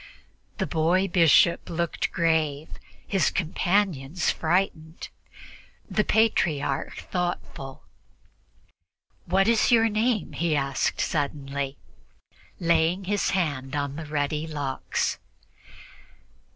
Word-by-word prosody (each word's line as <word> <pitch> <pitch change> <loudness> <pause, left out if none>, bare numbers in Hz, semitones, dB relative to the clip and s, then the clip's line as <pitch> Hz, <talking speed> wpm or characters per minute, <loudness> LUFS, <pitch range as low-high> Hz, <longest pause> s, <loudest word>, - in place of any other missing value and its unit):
The - - 0
boy 175 +4 +1
bishop 170 -1 +4
looked 170 0 -2
grave, 160 -4 0 0.4
his 195 -2 +2
companions 175 -3 0
frightened, 160 -1 -1 0.8
the 210 - +1
Patriarch 165 -12 +1
thoughtful. 175 -6 -4 1.4
"What 190 +3 +3
is 230 0 +3
your 225 -1 +5
name?" 215 -2 0
he 165 -2 0
asked 140 -1 -1
suddenly, 140 -2 -2 0.8
laying 170 +2 +2
his 205 +2 0
hand 140 -6 -2
on 145 -1 -2
the 160 0 -7
ruddy 150 +1 -1
locks. 145 -4 -2
160 Hz, 90 wpm, -26 LUFS, 145-185 Hz, 1.4 s, your